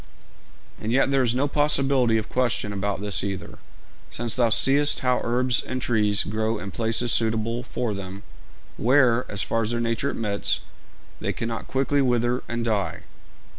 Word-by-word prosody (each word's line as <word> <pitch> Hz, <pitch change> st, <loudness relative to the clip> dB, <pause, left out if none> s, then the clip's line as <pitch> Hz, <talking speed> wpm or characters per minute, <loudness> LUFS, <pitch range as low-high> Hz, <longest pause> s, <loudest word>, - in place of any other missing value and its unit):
'And 110 Hz, -, -2 dB
yet 135 Hz, +2 st, +2 dB
there 135 Hz, -1 st, +3 dB
is 120 Hz, -1 st, +1 dB
no 140 Hz, +3 st, +1 dB
possibility 135 Hz, -5 st, +2 dB
of 110 Hz, -, -3 dB
question 120 Hz, -5 st, -1 dB
about 100 Hz, 0 st, -2 dB
this 100 Hz, -2 st, +2 dB
either, 95 Hz, -1 st, -5 dB, 0.5 s
since 115 Hz, -1 st, -2 dB
thou 120 Hz, -2 st, +3 dB
seest 140 Hz, +5 st, +3 dB
how 125 Hz, -1 st, +1 dB
herbs 125 Hz, +1 st, +1 dB
and 130 Hz, -, -4 dB
trees 110 Hz, -5 st, +2 dB
grow 110 Hz, +2 st, -1 dB
in 100 Hz, -1 st, -7 dB
places 115 Hz, +3 st, 0 dB
suitable 115 Hz, +1 st, 0 dB
for 120 Hz, -2 st, -3 dB
them, 100 Hz, 0 st, -7 dB, 0.5 s
where, 125 Hz, -1 st, +3 dB
as 100 Hz, -1 st, 0 dB
far 115 Hz, -, -1 dB
as 110 Hz, -, -2 dB
their 120 Hz, 0 st, -1 dB
nature 115 Hz, +4 st, -1 dB
admits, 105 Hz, -3 st, -1 dB, 0.6 s
they -, -, -2 dB
cannot 115 Hz, 0 st, -4 dB
quickly 135 Hz, +2 st, +1 dB
wither 125 Hz, -1 st, +1 dB
and 120 Hz, 0 st, -3 dB
die. 105 Hz, -4 st, -1 dB
115 Hz, 165 wpm, -24 LUFS, 110-125 Hz, 0.6 s, there